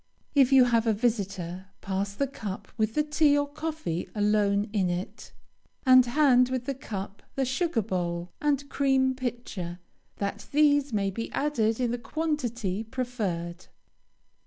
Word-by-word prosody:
If 275 -3 +5
you 265 -1 +8
have 230 -2 +2
a 220 - +4
visitor, 195 -5 -2
pass 195 +1 -3
the 280 - +1
cup 220 -8 -6
with 220 -1 0
the 300 - +3
tea 295 -1 +3
or 285 0 +1
coffee 305 - -4
alone 205 0 +2
in 190 -4 +1
it, 175 +2 -5 0.5
and 255 -1 +8
hand 250 -2 +4
with 255 -1 -2
the 275 - -1
cup 200 -7 -7
the 270 - +1
sugar 265 - 0
bowl 175 -3 -3
and 285 -1 +1
cream 265 -2 +2
pitcher, 235 -9 -5 0.4
that 200 0 -4
these 290 -1 +4
may 200 -2 0
be 230 +4 -5
added 230 -7 +1
in 245 -2 +1
the 240 - -2
quantity 240 - -2
preferred. 210 -8 -4
240 Hz, 150 wpm, -27 LUFS, 200-275 Hz, 0.5 s, you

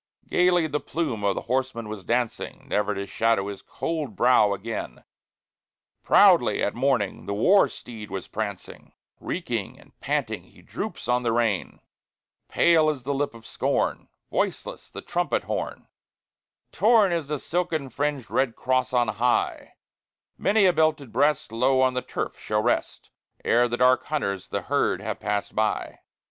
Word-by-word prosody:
Gayly 180 -2 +3
the 150 -1 -1
plume 145 -12 -3
of 100 -1 +2
the - - -4
horseman 125 -2 -2
was 105 -2 -7
dancing, 120 +3 -2
Never 105 0 0
to 100 +1 -3
shadow 105 -1 +1
his 100 - -7
cold 160 -4 -4
brow 120 -4 +4
again; 100 - -5 1.0
Proudly - - +5
at 105 - 0
morning 125 -5 0
the 100 - -2
war 190 - +5
steed 110 -4 -9
was 95 -2 -5
prancing, - - -6 0.3
Reeking - - -4
and - - -19
panting - - -2
he - - -20
droops - - -6
on 125 0 +2
the 120 -2 0
rein; 115 -4 -1 0.7
Pale 160 -2 +4
is 140 -5 -3
the 140 +3 -1
lip 140 -3 -2
of 115 -1 -14
scorn, - - -1 0.2
Voiceless - - -2
the - - -8
trumpet - - -1
horn, - - -4 0.8
Torn 215 -1 +4
is 165 -4 -1
the 150 0 -2
silken 165 -2 -2
fringed 140 -1 -2
red 130 -3 +1
cross 130 0 0
on 120 -2 +3
high; 120 +3 0 0.6
Many 205 0 +3
a 180 - +5
belted 155 -6 +1
breast 145 -5 +2
Low 130 +3 +2
on 130 0 +3
the 125 - -1
turf - - -5
shall 105 0 -1
rest 120 - -1 0.3
Ere 120 +1 +4
the 120 0 -2
dark 125 +1 +4
hunters 100 -11 -2
the - - -3
herd - - +1
have - - -4
passed 105 0 -2
by. 110 0 -1
125 Hz, 155 wpm, -25 LUFS, 110-150 Hz, 1.0 s, Proudly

